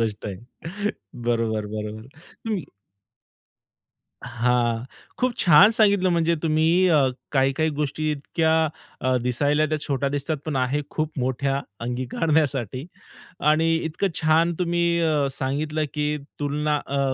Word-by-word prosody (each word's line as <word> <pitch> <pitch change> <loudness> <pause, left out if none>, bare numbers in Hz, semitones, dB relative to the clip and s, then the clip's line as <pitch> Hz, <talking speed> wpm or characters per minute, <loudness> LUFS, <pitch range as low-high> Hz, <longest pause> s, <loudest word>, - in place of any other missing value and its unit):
गोष्ट 110 -2 -2
आहे. 100 - -5 0.9
बरोबर, 115 -3 0
बरोबर. 110 +2 -6
तुम्ही 180 +6 -6 1.6
हां, 120 -1 0 0.3
खूप 255 0 +1
छान 175 +4 +7
सांगितलं 200 -4 +3
म्हणजे 170 -1 +2
तुम्ही. 165 +3 +3
अ, 150 -5 +4 0.3
काही, 135 -1 +3
काही 155 +4 0
गोष्टी 150 +1 -2
इतक्या 160 +3 0 0.5
अ, 130 0 +1
दिसायला 145 +5 +1
त्या 155 0 -1
छोट्या 140 -1 0
दिसतात, 145 +3 -2
पण 150 -3 -2
आहे 130 +3 +1
खूप 155 -2 -3
मोठ्या 135 +2 0 0.2
अंगीकारण्यासाठी 130 +1 -1 0.6
आणि 160 +2 +3
इतकं 160 +4 -1
छान 160 +2 +3
तुम्ही 170 -1 +1
अ, 155 -4 +2
सांगितलं, 150 +4 -2
की 150 0 0 0.2
तुलना 150 +1 0
अ, 140 0 -2
150 Hz, 125 wpm, -24 LUFS, 130-160 Hz, 1.6 s, छान